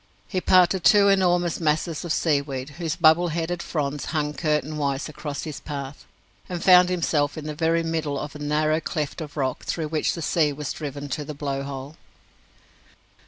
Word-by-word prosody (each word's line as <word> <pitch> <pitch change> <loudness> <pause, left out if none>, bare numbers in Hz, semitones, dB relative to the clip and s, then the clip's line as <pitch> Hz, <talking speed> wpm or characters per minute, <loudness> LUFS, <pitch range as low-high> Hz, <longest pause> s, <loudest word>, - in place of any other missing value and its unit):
He 185 -3 -2
parted 185 0 +4
two 205 -1 +6
enormous 175 -3 +2
masses 155 0 0
of 170 - -4
seaweed, 140 -4 0
whose 165 -2 -2
bubble 165 +1 +5
headed 170 +2 -2
fronds 145 -4 -3
hung 150 -2 -1
curtainwise 150 -3 -1
across 145 -1 -6
his 155 -3 -6
path, 140 -2 -7 0.4
and 175 -2 -4
found 180 -1 +7
himself 160 -5 0
in 155 - -6
the 155 - -4
very 165 +2 +1
middle 160 -3 -2
of 145 0 -5
the 150 - -9
narrow 155 +1 +1
cleft 155 -2 -3
of 150 -1 -8
rock 130 -2 -1
through 160 -3 -3
which 155 -1 0
the 165 - -5
sea 150 -3 +2
was 145 0 -4
driven 145 -1 -6
to 150 +2 -3
the 150 +1 -7
Blow 140 -1 -3
hole. 140 +2 -7
155 Hz, 175 wpm, -24 LUFS, 145-170 Hz, 0.4 s, found